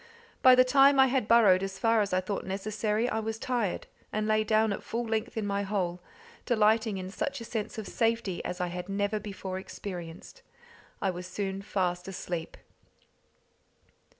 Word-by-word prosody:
By 255 Hz, -1 st, +8 dB
the 255 Hz, -, +7 dB
time 275 Hz, +2 st, +5 dB
I 265 Hz, -, +8 dB
had 255 Hz, -4 st, 0 dB
burrowed 210 Hz, -6 st, +6 dB
as 195 Hz, 0 st, -4 dB
far 225 Hz, -1 st, +3 dB
as 200 Hz, -, -1 dB
I 185 Hz, 0 st, +2 dB
thought 195 Hz, +2 st, -3 dB
necessary, 210 Hz, +3 st, -1 dB
I 220 Hz, -, -1 dB
was 220 Hz, 0 st, -3 dB
tired, 235 Hz, -5 st, -2 dB, 0.3 s
and 215 Hz, 0 st, -1 dB
lay 215 Hz, 0 st, +3 dB
down 215 Hz, 0 st, +2 dB
at -, -, -5 dB
full 235 Hz, +1 st, -3 dB
length 225 Hz, +1 st, -2 dB
in 220 Hz, -, -1 dB
my 200 Hz, 0 st, -1 dB
hole, 185 Hz, -3 st, -2 dB, 0.4 s
delighting 220 Hz, -2 st, +2 dB
in 185 Hz, 0 st, -6 dB
such 280 Hz, +6 st, -3 dB
a 230 Hz, -, -7 dB
sense 225 Hz, +1 st, -4 dB
of 215 Hz, -3 st, -5 dB
safety 225 Hz, -5 st, 0 dB
as 180 Hz, -, -4 dB
I 180 Hz, -1 st, -1 dB
had 180 Hz, +2 st, -6 dB
never 205 Hz, +2 st, 0 dB
before 195 Hz, -2 st, -5 dB
experienced. 180 Hz, -, -8 dB, 0.6 s
I 195 Hz, -, +2 dB
was 180 Hz, 0 st, -7 dB
soon 195 Hz, 0 st, -3 dB
fast 180 Hz, -3 st, -2 dB
asleep. 175 Hz, -3 st, -5 dB
210 Hz, 175 wpm, -29 LUFS, 190-225 Hz, 0.6 s, By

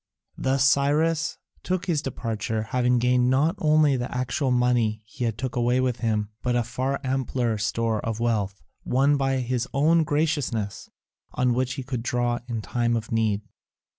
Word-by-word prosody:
Thus 135 Hz, 0 st, +1 dB
Cyrus 150 Hz, +4 st, +2 dB, 0.2 s
took 185 Hz, -1 st, -2 dB
his 160 Hz, -5 st, 0 dB
departure, 110 Hz, -5 st, -3 dB
having 125 Hz, +2 st, +1 dB
gained 125 Hz, +1 st, +3 dB
not 145 Hz, +6 st, +3 dB
only 155 Hz, -2 st, +4 dB
the 125 Hz, 0 st, -3 dB
actual 125 Hz, +2 st, -1 dB
money 120 Hz, -3 st, +1 dB
he 115 Hz, +1 st, -2 dB
took 125 Hz, +4 st, -5 dB
away 120 Hz, +1 st, +2 dB
with 130 Hz, -2 st, 0 dB
him, 105 Hz, -3 st, 0 dB
but 125 Hz, -1 st, 0 dB
a 120 Hz, -, +2 dB
far 130 Hz, +4 st, -2 dB
ampler 130 Hz, -4 st, -1 dB
store 115 Hz, +1 st, -1 dB
of 115 Hz, -1 st, -3 dB
wealth, 105 Hz, -5 st, -1 dB, 0.2 s
won 140 Hz, +3 st, +3 dB
by 135 Hz, -1 st, +1 dB
his 125 Hz, 0 st, -1 dB
own 160 Hz, +4 st, +4 dB
graciousness, 145 Hz, -9 st, -1 dB, 0.4 s
on 125 Hz, -1 st, +2 dB
which 130 Hz, +1 st, 0 dB
he 135 Hz, -, -5 dB
could 125 Hz, -2 st, -4 dB
draw 120 Hz, 0 st, 0 dB
in 115 Hz, -3 st, -3 dB
time 120 Hz, -1 st, 0 dB
of 115 Hz, -2 st, -4 dB
need. 110 Hz, -2 st, +1 dB
125 Hz, 165 wpm, -25 LUFS, 115-135 Hz, 0.4 s, only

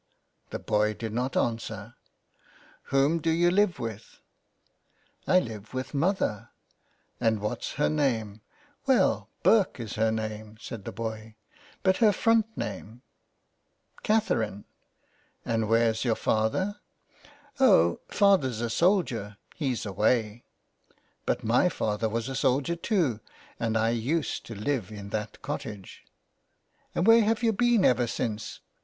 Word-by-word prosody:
The -, -, -4 dB
boy 105 Hz, 0 st, 0 dB
did 110 Hz, -1 st, -5 dB
not 125 Hz, +3 st, -1 dB
answer, 115 Hz, -1 st, -2 dB, 0.5 s
" -, -, -28 dB
Whom 140 Hz, +4 st, +2 dB
do 165 Hz, -, -1 dB
you 170 Hz, +2 st, +3 dB
live 200 Hz, -1 st, +2 dB
with? 115 Hz, -3 st, -7 dB, 0.4 s
" -, -, -45 dB
" -, -, -39 dB
I 185 Hz, -, +6 dB
live 110 Hz, -, -7 dB
with 130 Hz, +3 st, -4 dB
mother," 145 Hz, -, 0 dB, 0.4 s
" -, -, -42 dB
And 110 Hz, -2 st, +2 dB
what's 105 Hz, +1 st, -3 dB
her 150 Hz, -, +1 dB
name? 115 Hz, -9 st, 0 dB
^' -, -, -25 dB, 0.3 s
'' 290 Hz, -1 st, -38 dB
Well, 265 Hz, -2 st, +2 dB
Burke 205 Hz, -, +4 dB
is 115 Hz, -3 st, -5 dB
her 110 Hz, 0 st, +2 dB
name," 110 Hz, 0 st, -5 dB
said 110 Hz, -3 st, -8 dB
the -, -, -4 dB
boy, 110 Hz, +1 st, -6 dB, 0.2 s
'' 295 Hz, 0 st, -27 dB
But 190 Hz, -1 st, +3 dB
her 220 Hz, -3 st, +5 dB
front 225 Hz, +1 st, +3 dB
name? 115 Hz, +4 st, -6 dB, 0.3 s
" -, -, -48 dB
'' -, -, -27 dB
Catherine," 115 Hz, -, 0 dB, 0.4 s
" -, -, -39 dB
And 115 Hz, -2 st, 0 dB
Where's 115 Hz, -1 st, +2 dB
your 120 Hz, -3 st, +1 dB
father? 110 Hz, -, 0 dB, 0.3 s
" 290 Hz, -, -26 dB
" 290 Hz, -1 st, -28 dB
Oh, 85 Hz, -, +5 dB
father's 185 Hz, -, +3 dB
a 120 Hz, -1 st, -2 dB
soldier; 125 Hz, -, +1 dB, 0.2 s
he's 130 Hz, -8 st, -2 dB
away." 110 Hz, +3 st, 0 dB, 0.4 s
" -, -, -38 dB
But -, -, 0 dB
my -, -, +3 dB
father 110 Hz, +1 st, -1 dB
was 115 Hz, +2 st, -2 dB
a 135 Hz, -, -4 dB
soldier 135 Hz, +7 st, +1 dB
too, 170 Hz, -, 0 dB, 0.4 s
and 115 Hz, -1 st, 0 dB
I 115 Hz, +1 st, +2 dB
used 135 Hz, +8 st, -2 dB
to 115 Hz, -, -7 dB
live 110 Hz, -1 st, -2 dB
in 100 Hz, -1 st, -8 dB
that 105 Hz, -1 st, -4 dB
cottage." 100 Hz, -4 st, -6 dB, 0.4 s
'* -, -, -42 dB
And 175 Hz, -, +1 dB
where 225 Hz, +1 st, +7 dB
have 225 Hz, +2 st, 0 dB
you 225 Hz, -1 st, +3 dB
been 235 Hz, -1 st, +3 dB
ever 125 Hz, -1 st, +3 dB
since 110 Hz, -2 st, -4 dB
120 Hz, 160 wpm, -27 LUFS, 110-175 Hz, 0.5 s, where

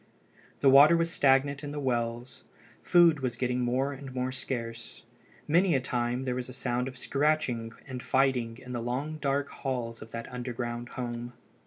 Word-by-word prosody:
The 140 Hz, -, +6 dB
water 145 Hz, +5 st, +8 dB
was 165 Hz, 0 st, 0 dB
stagnant 140 Hz, 0 st, +3 dB
in 145 Hz, -, -5 dB
the 145 Hz, -, -4 dB
wells. 120 Hz, -2 st, -2 dB, 0.4 s
Food 170 Hz, -4 st, +5 dB
was 130 Hz, -3 st, -2 dB
getting 125 Hz, +1 st, -1 dB
more 130 Hz, +3 st, 0 dB
and 135 Hz, -1 st, -9 dB
more 130 Hz, 0 st, -1 dB
scarce. 115 Hz, -3 st, -5 dB, 0.4 s
Many 175 Hz, +2 st, +4 dB
a -, -, +3 dB
time 125 Hz, 0 st, -1 dB
there 130 Hz, -1 st, -1 dB
was 125 Hz, 0 st, -4 dB
a -, -, -8 dB
sound 125 Hz, -1 st, -1 dB
of 130 Hz, -1 st, -7 dB
scratching 135 Hz, -7 st, 0 dB
and 130 Hz, -2 st, -6 dB
fighting 125 Hz, -4 st, +1 dB
in 125 Hz, -, -10 dB
the 120 Hz, -, -2 dB
long 135 Hz, +6 st, -3 dB
dark 140 Hz, -1 st, -1 dB
halls 120 Hz, -5 st, -4 dB
of 110 Hz, -, -10 dB
that 115 Hz, 0 st, -6 dB
underground 120 Hz, -1 st, -4 dB
home. 120 Hz, -1 st, -4 dB
130 Hz, 175 wpm, -29 LUFS, 120-140 Hz, 0.4 s, water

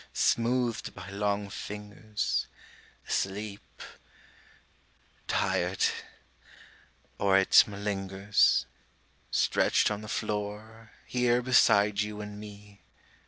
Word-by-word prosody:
Smoothed 120 Hz, 0 st, 0 dB
by 95 Hz, 0 st, -9 dB
long 100 Hz, 0 st, -1 dB
fingers, 105 Hz, +1 st, -4 dB, 0.6 s
Asleep... 100 Hz, +1 st, -4 dB, 1.4 s
tired... -, -, 0 dB, 1.3 s
or 100 Hz, -1 st, +4 dB
it 95 Hz, -, +6 dB
malingers, 100 Hz, -1 st, +1 dB, 0.6 s
Stretched -, -, +2 dB
on 105 Hz, 0 st, -3 dB
the 110 Hz, -, -9 dB
floor, 105 Hz, +1 st, -5 dB
here 125 Hz, 0 st, +1 dB
beside 105 Hz, -5 st, +4 dB
you 105 Hz, 0 st, -4 dB
and 105 Hz, 0 st, -7 dB
me. 105 Hz, -1 st, -12 dB
105 Hz, 80 wpm, -29 LUFS, 100-110 Hz, 1.4 s, it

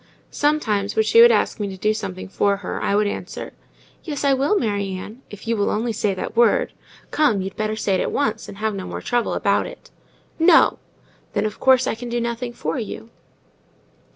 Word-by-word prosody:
Sometimes, 220 Hz, -10 st, 0 dB
when 220 Hz, -, +3 dB
she 225 Hz, +1 st, +6 dB
would 235 Hz, 0 st, +9 dB
ask 220 Hz, +1 st, +1 dB
me 205 Hz, -, -1 dB
to 190 Hz, -1 st, -7 dB
do 210 Hz, +3 st, +1 dB
something 185 Hz, -3 st, -5 dB
for 200 Hz, +1 st, +1 dB
her, -, -, -4 dB
I 200 Hz, -, +1 dB
would 210 Hz, +1 st, +3 dB
answer,—"Yes, 290 Hz, +7 st, -7 dB
I 280 Hz, -1 st, +4 dB
will, 280 Hz, +10 st, +2 dB
Mary 200 Hz, -, -1 dB
Ann, 215 Hz, +7 st, -9 dB
if 205 Hz, +1 st, -11 dB
you 230 Hz, -, +1 dB
will 205 Hz, -2 st, +1 dB
only 225 Hz, +2 st, -1 dB
say 205 Hz, -2 st, 0 dB
that 190 Hz, -, -5 dB
word. 240 Hz, -, +3 dB, 0.4 s
Come! 245 Hz, -11 st, +2 dB
you'd 190 Hz, 0 st, -6 dB
better 215 Hz, 0 st, -2 dB
say 205 Hz, -2 st, -1 dB
it 185 Hz, -, +1 dB
at -, -, -1 dB
once, 255 Hz, -7 st, -1 dB
and 195 Hz, -, -10 dB
have 215 Hz, +1 st, -1 dB
no 190 Hz, -2 st, -5 dB
more -, -, -6 dB
trouble 240 Hz, -1 st, 0 dB
about -, -, +1 dB
it." -, -, -13 dB, 0.5 s
"No." 325 Hz, 0 st, +5 dB, 0.5 s
"Then, 205 Hz, -, 0 dB
of 215 Hz, 0 st, -4 dB
course, 260 Hz, -1 st, +4 dB
I -, -, 0 dB
can 240 Hz, +2 st, -7 dB
do 240 Hz, 0 st, -1 dB
nothing 235 Hz, +1 st, -3 dB
for 160 Hz, -9 st, -3 dB
you." 225 Hz, 0 st, -7 dB
220 Hz, 210 wpm, -22 LUFS, 205-245 Hz, 0.5 s, would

